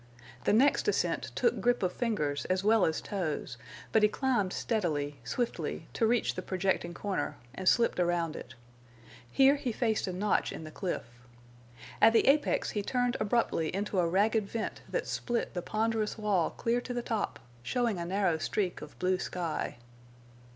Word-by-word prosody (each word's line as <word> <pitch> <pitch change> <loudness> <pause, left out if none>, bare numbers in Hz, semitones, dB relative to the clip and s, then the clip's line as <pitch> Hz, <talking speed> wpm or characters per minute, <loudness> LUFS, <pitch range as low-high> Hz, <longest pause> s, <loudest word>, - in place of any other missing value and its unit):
The - - +4
next 265 +7 +4
ascent - - 0
took 475 - +1
grip 245 -3 +2
of 180 - 0
fingers 150 - -1
as 185 +1 0
well 215 -1 +4
as 160 - -1
toes, 155 - -3 0.3
but 220 - +4
he 210 - +5
climbed 240 -7 0
steadily, 150 - -1
swiftly, 235 - -3
to 225 - +2
reach 240 +1 +2
the 185 - -4
projecting 185 -2 -1
corner, 200 0 -2 0.2
and 185 +5 +2
slipped 235 -5 +2
around 170 -2 +1
it. 130 - -9 0.7
Here 270 - +5
he 255 -3 -2
faced 220 -2 0
a - - -1
notch 195 +3 0
in - - -7
the 155 - -8
cliff. 180 +2 -3 1.0
At 225 - +7
the 230 - +4
apex 290 +2 +3
he 210 - -1
turned 245 +3 0
abruptly 215 -6 +1
into 200 -1 -1
a 175 - +3
ragged 210 +3 +2
vent 225 -1 -4
that - - -1
split 240 -1 -2
the 175 - -2
ponderous 220 +2 -1
wall 205 -6 +1
clear 235 +1 -1
to 245 0 -5
the 240 - -2
top, 225 -3 -2 0.2
showing 230 - 0
a 170 - -3
narrow 185 -3 +1
streak 185 +2 -1
of 150 - -10
blue 185 0 +1
sky. 170 -9 -3
205 Hz, 170 wpm, -30 LUFS, 175-230 Hz, 1.0 s, At